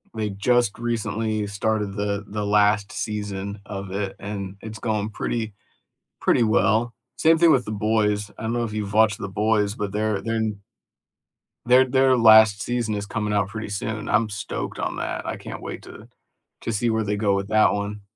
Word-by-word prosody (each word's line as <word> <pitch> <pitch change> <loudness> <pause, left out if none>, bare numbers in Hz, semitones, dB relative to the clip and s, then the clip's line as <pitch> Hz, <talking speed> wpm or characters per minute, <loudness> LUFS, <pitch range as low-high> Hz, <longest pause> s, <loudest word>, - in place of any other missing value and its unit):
they 110 -1 -1
just 120 +2 +1
recently 110 -2 -2
started 100 0 -1
the 100 0 -2
the 105 0 -3
last 105 0 +3
season 100 -1 -4
of 100 -2 -6
it, 100 0 -3
and 100 -1 -5
it's 110 0 -8
going 110 -2 -1
pretty 110 0 -3 0.7
pretty 120 - +3
well. 110 +3 +2 0.2
Same 165 +1 +4
thing 165 -1 +5
with 125 -3 +3
The 110 - -5
Boys. 105 -1 0
I - - -8
don't 115 +1 -1
know 120 - 0
if 110 -2 -4
you've 105 -1 -3
watched 110 -2 +4
The - - -4
Boys, 105 0 +1
but 105 -2 -3
their 105 -1 -1
their 115 0 -2
n 110 -2 -2 1.0
their 125 +2 +6
their 130 0 +3
last 110 -3 +7
season 120 -3 -1
is 100 - -3
coming 105 0 -2
out 100 -2 +1
pretty 110 0 -6
soon. 110 +1 -4
I'm 110 0 +2
stoked 100 - -5
on - - -2
that. - - -4
I - - -3
can't - - -8
wait - - -7
to - - -12 0.5
to 115 - -3
see 115 +3 +1
where 110 0 +1
they 105 0 -1
go 100 -2 +2
with 100 0 -2
that 110 0 +4
one. 105 0 -4
105 Hz, 190 wpm, -23 LUFS, 100-110 Hz, 1.0 s, last